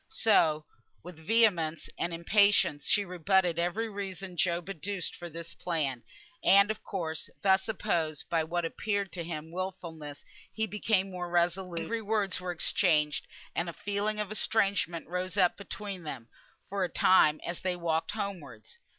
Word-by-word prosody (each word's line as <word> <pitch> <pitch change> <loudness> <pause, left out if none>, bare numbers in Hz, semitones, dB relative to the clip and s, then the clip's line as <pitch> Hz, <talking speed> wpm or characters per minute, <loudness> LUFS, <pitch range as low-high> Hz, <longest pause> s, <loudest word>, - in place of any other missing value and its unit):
So 160 - +3 0.4
with 175 -1 -10
vehemence 170 -4 +2
and 175 - -2
impatience 170 -3 +3
she 205 -1 +3
rebutted 180 -1 +2
every 180 +7 0
reason 195 -3 -6
Job 175 0 0
adduced 195 +1 -3
for 175 - -8
his 170 +1 -8
plan; 150 -10 -2 0.4
and 200 +2 +6
of 215 - -7
course, 165 -5 -4
thus 190 +1 +3
opposed, 160 -7 -1
by 165 -2 +1
what 170 +2 -1
appeared 200 +2 -2
to 170 0 -4
him 160 -1 -6
wilfulness, 170 -5 -6 0.3
he 220 - -1
became 205 -2 0
more 180 -1 -4
resolute, 175 +1 +1
and 165 - -1
angry 230 +7 -2
words 205 -3 0
were 180 -1 -2
exchanged, 155 -3 +1 0.3
and 170 +1 -1
a - - -6
feeling 205 +3 -2
of 210 -1 -2
estrangement 200 -6 +1
rose 180 +2 -3
up 180 -2 +4
between 200 -1 -6
them, 135 -7 -7 0.4
for 195 -1 -1
a 180 - 0
time, 155 -5 +5
as 175 - -3
they 185 -1 -1
walked 165 -2 -1
homewards. 170 - -6
180 Hz, 160 wpm, -30 LUFS, 165-200 Hz, 0.4 s, and